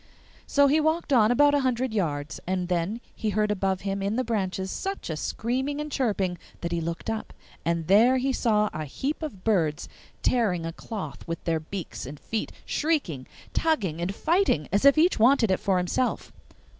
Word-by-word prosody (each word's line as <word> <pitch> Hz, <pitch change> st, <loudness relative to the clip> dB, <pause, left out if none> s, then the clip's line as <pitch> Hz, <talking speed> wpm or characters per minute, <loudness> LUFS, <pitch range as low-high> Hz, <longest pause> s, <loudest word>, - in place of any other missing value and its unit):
So 285 Hz, 0 st, +4 dB
he 290 Hz, +3 st, +4 dB
walked 315 Hz, -1 st, +1 dB
on 220 Hz, -4 st, +5 dB
about 290 Hz, +4 st, +5 dB
a 290 Hz, -, +4 dB
hundred 255 Hz, -2 st, 0 dB
yards, 150 Hz, -7 st, -2 dB
and 185 Hz, -1 st, -1 dB
then 180 Hz, +6 st, -1 dB
he 220 Hz, -, -2 dB
heard 210 Hz, +1 st, +1 dB
above 190 Hz, -2 st, 0 dB
him 195 Hz, 0 st, -2 dB
in 200 Hz, +2 st, -1 dB
the 255 Hz, -, +1 dB
branches 190 Hz, -5 st, -2 dB
such 390 Hz, -, -4 dB
a -, -, -2 dB
screaming 260 Hz, -, -2 dB
and 300 Hz, 0 st, -4 dB
chirping 195 Hz, -10 st, 0 dB, 0.2 s
that 170 Hz, -, -3 dB
he 170 Hz, -1 st, 0 dB
looked 170 Hz, +1 st, -4 dB
up, 225 Hz, -1 st, -3 dB, 0.3 s
and 170 Hz, -1 st, 0 dB
there 225 Hz, +9 st, +5 dB
he 265 Hz, +1 st, 0 dB
saw 210 Hz, -4 st, +2 dB
a 155 Hz, -, -4 dB
heap 275 Hz, -, -3 dB
of 240 Hz, -13 st, -6 dB
birds 165 Hz, -9 st, +1 dB, 0.4 s
tearing 195 Hz, -9 st, +1 dB
a 165 Hz, -, -4 dB
cloth 185 Hz, -, -7 dB
with 165 Hz, 0 st, -4 dB
their 165 Hz, -1 st, 0 dB
beaks 160 Hz, -4 st, -6 dB
and 140 Hz, +1 st, -8 dB
feet, 220 Hz, -1 st, -3 dB
shrieking, 280 Hz, -, -1 dB, 0.3 s
tugging, 200 Hz, -, 0 dB
and 190 Hz, +3 st, -2 dB
fighting, 325 Hz, -, +2 dB
as 200 Hz, +8 st, +2 dB
if 280 Hz, +2 st, +7 dB
each 335 Hz, -2 st, +4 dB
wanted 235 Hz, -2 st, +5 dB
it 185 Hz, -, +2 dB
for 195 Hz, -2 st, +1 dB
himself. 180 Hz, +8 st, -1 dB
210 Hz, 190 wpm, -26 LUFS, 175-260 Hz, 0.4 s, if